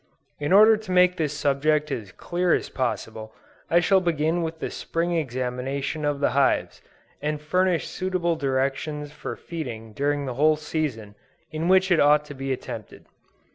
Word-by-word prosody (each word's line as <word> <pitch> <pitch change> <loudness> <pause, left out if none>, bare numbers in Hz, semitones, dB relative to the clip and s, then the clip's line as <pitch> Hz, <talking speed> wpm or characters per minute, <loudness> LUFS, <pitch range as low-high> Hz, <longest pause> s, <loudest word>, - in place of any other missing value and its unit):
In 145 +3 -2
order 215 +3 +7
to 215 -3 -8
make 180 0 +5
this 155 -3 0
subject 150 +1 +1
as 105 -5 -4
clear 175 - 0
as - - -3
possible, 110 -3 -4 0.3
I 170 - +5
shall 190 +2 +3
begin 165 0 0
with 165 0 -3
the - - -4
Spring 170 +1 -2
examination 135 +1 -2
of 145 -1 0
the 140 - +2
hives, 135 +1 +1 0.4
and 150 +1 -2
furnish 180 +2 +1
suitable 185 -2 -1
directions 140 +1 -2
for - - -6
feeding 115 -10 -7
during 145 +3 -1
the 130 - -3
whole 155 +5 +4
season 150 -9 -4 0.4
in 155 +2 -2
which 190 +1 +4
it 175 - +5
ought 150 +1 +5
to 145 - -9
be 135 0 -4
attempted. 130 - -6
150 Hz, 165 wpm, -25 LUFS, 135-170 Hz, 0.4 s, order